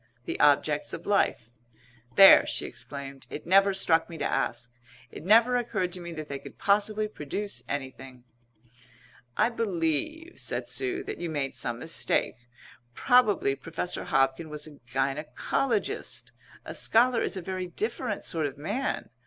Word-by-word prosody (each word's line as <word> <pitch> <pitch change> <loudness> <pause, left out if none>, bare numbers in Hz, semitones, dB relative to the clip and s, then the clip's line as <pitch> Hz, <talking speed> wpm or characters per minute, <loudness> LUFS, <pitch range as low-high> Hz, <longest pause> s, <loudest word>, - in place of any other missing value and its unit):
the - - -4
objects 150 +1 +3
of 165 - -7
life. 120 - +1 0.6
"There!" 195 -1 +9
she - - -2
exclaimed. 140 -1 -8
"It 150 - -7
never 195 +3 +5
struck 170 -4 +2
me 165 - -8
to - - -2
ask. 120 -2 -2 0.4
It - - -9
never 230 +6 +5
occurred 205 -7 -1
to 185 - -4
me 170 -1 -7
that 155 -2 -6
they 140 -1 -5
could - - -12
possibly 210 +1 +2
produce 205 +2 -5
anything." 130 -2 -6 1.1
"I 220 - +4
believe," 230 - -2
said - - -3
Sue, 380 -1 -2
"that 410 - -6
you 170 - -3
made 145 -4 -2
some 120 -1 -3
mistake. 125 -4 -2 0.5
Probably 215 - +3
Professor 165 +5 -4
Hobkin 135 -1 +1
was 150 -1 -3
a 150 -2 -13
gynæcologist. 155 - -2 0.3
A - - -6
scholar 235 +1 +3
is - - -1
a - - -4
very 185 0 -4
different 215 +4 -3
sort 160 -4 0
of 135 - -9
man. 205 - -3
170 Hz, 150 wpm, -28 LUFS, 145-215 Hz, 1.1 s, There